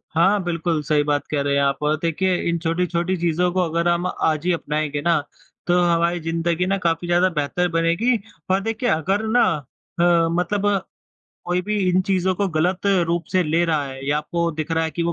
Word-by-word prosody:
हाँ, 190 +4 +3
बिल्कुल 170 -2 -1
सही 150 0 +2
बात 145 0 -1
कह 145 -2 0
रहे 140 0 0
हैं 140 - +2
आप 140 0 +1
और 150 +1 +2
देखिए, 180 +3 0
इन 170 - 0
छोटी-छोटी 175 +2 -1
चीज़ों 175 +1 +1
को 185 - +1
अगर 170 +2 0
हम 175 +1 +1
आज 155 -2 -1
ही 180 - +2
अपनाएँगे 150 -2 -2
ना, 165 +1 +2 0.5
तो 175 0 +3
हमारी 170 0 +1
ज़िंदगी 165 +2 -1
ना 195 +1 0
काफ़ी 170 0 0
ज़्यादा 175 +2 +3
बेहतर 165 +2 -1
बनेगी। 170 +9 +2 0.3
और 190 - +3
देखिए, 225 +3 -2
अगर 195 +5 0
ना 240 +2 +4 0.6
अ, 170 -1 +4
मतलब 180 +4 -1 0.8
कोई 180 +1 0
भी 210 +2 -2
इन 180 +1 +3
चीज़ों 185 -1 +1
को 200 +2 0
गलत 180 +4 0 0.2
रूप 170 0 -1
से 185 -1 +3
ले 165 +1 +1
रहा 155 -3 0
है 135 0 -8
या 145 +1 +2
आपको 170 +2 -1
दिख 155 +2 -5
रहा 160 0 +1
है 160 - -2
कि 170 - -3
वो 170 0 0
170 Hz, 205 wpm, -22 LUFS, 160-180 Hz, 0.8 s, ना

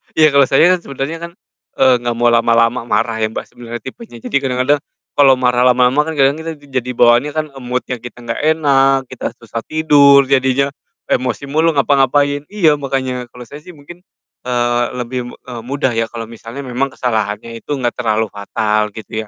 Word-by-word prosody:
Iya 155 -2 +5
kalo 140 -2 +4
saya 165 +6 +4
kan 180 - +2
sebenernya 140 +1 -5
kan, - - -16 0.4
eee, 130 -1 +4
gak 120 -1 -2
mau 120 0 +2
lama-lama 115 +1 +2
marah 110 +1 0
ya, 110 - +1
Mbak, 110 - -6
sebenernya 120 -1 -8
tipenya, 220 - -10
jadi 140 - 0
kadang-kadang, 135 +2 +1 0.3
kalo 135 -2 +5
marah 125 0 +2
lama-lama 125 +5 +3
kan 160 - -4
kadang 140 +2 +2
kita 160 0 -5
jadi 135 -4 -5
bawaannya 120 +5 +4
kan 155 0 0
mood-nya 125 0 -4
kita 120 0 -11
gak 115 0 -4
enak, 135 -4 +2
kita 130 - -5
susah 115 0 -7
tidur 145 -3 +5
jadinya, 135 +1 +1 0.4
emosi 125 +1 -1
mulu 160 +1 +2
ngapa-ngapain. 145 +1 +2
Iya 170 -8 +2
makanya 130 -3 -3
kalo 125 +1 -12
saya 145 +5 -11
sih 175 +2 -14
mungkin, 160 +5 -13 0.5
eee, 120 -1 +1 0.2
lebih 125 +1 -5
mu - - -10
eee, 120 -3 -9
mudah 135 -2 -1
ya 115 0 -1
kalo 115 -1 -7
misalnya 115 +4 -9
memang 130 +2 -3
kesalahannya 110 -1 -3
itu 145 - -4
gak 120 - +1
terlalu 110 -2 0
fatal 105 +1 -1
gitu 110 0 -6
130 Hz, 180 wpm, -16 LUFS, 120-140 Hz, 0.5 s, Iya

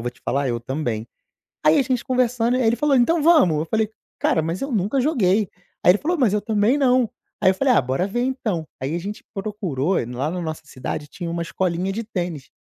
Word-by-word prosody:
eu - - -6
vou 120 - -2
te 125 - -25
falar, 140 0 0
eu 120 -1 -1
também". 120 -3 -3 0.6
Aí 155 +1 +6
a - - +5
gente 255 -2 -1
conversando, 250 -1 +1
aí 255 - +1
ele 225 - +3
falou: 285 +3 +2
"Então 310 +6 +3
vamos", 295 - +5
eu 155 - -1
falei: 220 +4 0 0.3
"Cara, 160 - +2
mas 165 +3 -3
eu 275 - -3
nunca 215 +6 +1
joguei", 215 - +2 0.3
aí - - +8
ele 190 - +2
falou: 345 +3 0
"Mas 245 -9 +3
eu 210 - +1
também 215 +5 +2
não", 255 -4 +3 0.3
aí 185 - +6
eu - - -4
falei: 260 +5 +3
"Ah, - - +5
bora 130 +7 -1
ver 240 +5 -2
então". 220 - -2
Aí 135 +5 -2
a 175 - -1
gente 205 +4 -6
procurou, 195 - -2
lá 125 +3 -2
na 180 0 -3
nossa 160 -2 -4
cidade 145 +2 -5
tinha 170 +2 -6
uma 170 0 -2
escolinha 180 +2 -1
de 225 +3 -3
tênis. 175 - -4
195 Hz, 235 wpm, -22 LUFS, 155-245 Hz, 0.6 s, aí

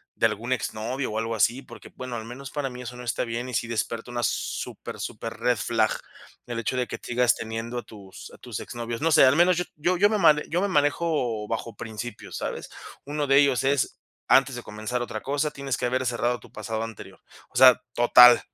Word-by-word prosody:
de - - +4
algún 115 +4 -2
ex 130 - -3
novio 125 +4 -3
o 110 - -3
algo 115 0 -2
así, 120 +5 +2
porque, - - -12
bueno, 130 -1 -6
al 110 - -5
menos 125 +3 -8
para 145 -2 -2
mí 125 0 -8
eso 125 0 -7
no 125 - -8
está 120 -1 -1
bien, 120 +2 -4
y - - -7
sí 115 - 0
despierta 115 +1 -3
una 120 - -2
súper, - - -3
súper - - -5
red 125 -1 +2
flag, 110 0 +1 0.6
el 120 -1 -3
hecho 115 +3 -2
de 125 - +1
que - - -6
sigas 120 0 +2
teniendo 115 +2 -4
a - - -8
tus 100 -3 -12
a - - -13
tus - - -7
ex - - -8
novios 115 0 -4
no 165 +1 +2
sé, 155 - +7
al 130 +2 +5
menos 175 +1 +4
yo 180 - +1
yo 175 +4 0
yo 205 +3 +5
me 215 - +2
man 155 -4 +5
yo 175 +3 +1
me 200 - +1
manejo 145 - +1
bajo 115 0 -4
principios, 110 +1 -7
¿sabes? - - -5 0.4
Uno 145 +1 -2
de 135 0 +5
ellos 140 -5 +3
es 135 0 0 0.3
"antes 135 0 +5
de 120 - -5
comenzar 110 +4 -4
otra 110 -2 -4
cosa, 145 +2 0
tienes 140 -3 -3
que 125 - -1
haber 130 +1 -1
cerrado 120 0 0
tu - - -17
pasado 110 +1 -4
anterior". 115 -3 -9 0.3
O - - -7
sea, 130 -1 +8
total, 120 0 +8
125 Hz, 230 wpm, -25 LUFS, 115-140 Hz, 0.6 s, sea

